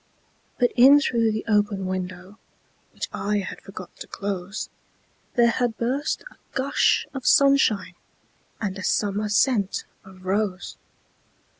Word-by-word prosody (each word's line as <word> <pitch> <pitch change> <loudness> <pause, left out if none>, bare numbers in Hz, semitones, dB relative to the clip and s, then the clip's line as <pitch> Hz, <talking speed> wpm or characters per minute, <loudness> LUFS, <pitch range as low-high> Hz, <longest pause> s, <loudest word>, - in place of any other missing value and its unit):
But 245 -1 +3
in 270 +4 +8
through 230 -6 +1
the 215 0 -3
open 205 -3 +1
window, 185 +2 -5 0.5
Which - - -5
I 205 +1 -1
had 200 - -5
forgot 185 -2 -10
to - - -9
close, 200 0 -4 0.7
There 235 -1 +5
had 240 -2 -1
burst 265 +5 -1
a - - -20 0.2
gush 275 +1 +2
of 270 - -4
sunshineAnd 255 - +4 0.9
a - - -6
summer 210 +1 0
scent 205 -2 +1 0.2
of 190 -2 -15
rose. 195 -1 -1
210 Hz, 125 wpm, -24 LUFS, 195-245 Hz, 0.9 s, in